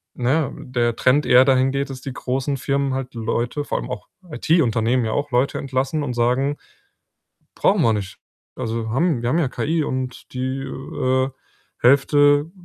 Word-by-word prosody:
na 125 +1 0
ja, 155 -4 0
der 120 -2 -1
Trend 140 +5 +3
eher 125 +1 +7
dahin 130 0 +3
geht, 140 +1 -2
dass 135 -1 -7
die 135 0 -6
großen 130 +3 -2
Firmen 140 +1 -1
halt 135 0 -4
Leute, 120 +5 -2
vor - - -2
allem - - -7
auch - - -6 0.2
IT-Unternehmen 125 -7 +2
ja 110 - -1
auch, 145 -1 -2
Leute 125 +3 +1
entlassen 135 +3 -1
und 125 - -3
sagen: 125 +4 +1 1.0
„Brauchen - - +2
wir 115 - +4
nicht, 100 -2 -5 0.4
also 115 0 -3
haben 150 +1 +1
wir 120 - -1
haben 160 - +2
ja 155 -6 +1
KI 155 +4 -1
und 130 -1 -5
die, 130 +1 -2
äh, 130 -1 -1 0.5
Hälfte 145 +3 +4
130 Hz, 170 wpm, -21 LUFS, 125-140 Hz, 1.0 s, eher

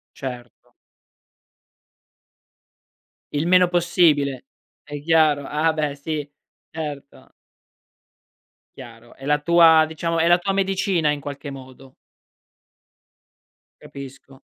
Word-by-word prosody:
Certo. 125 -3 -9 2.6
Il 150 +3 -1
meno 180 0 +4
possibile, 165 -7 +1 0.4
è 145 0 -8
chiaro, 155 -3 +2
ah, 155 +3 0
beh 150 -2 -2
sì, 150 0 -4 0.4
certo. 145 -3 -8 1.5
Chiaro. 115 0 -13
È 135 - -13
la 150 0 +1
tua, 165 0 +5
diciamo, 165 +1 -2
è 165 - +3
la 175 - +5
tua 195 +2 -2
medicina 190 -4 0
in 145 - -2
qualche 140 0 -8
modo. 130 -1 -13 1.9
Capisco. 135 0 -12
150 Hz, 95 wpm, -22 LUFS, 140-165 Hz, 2.6 s, tua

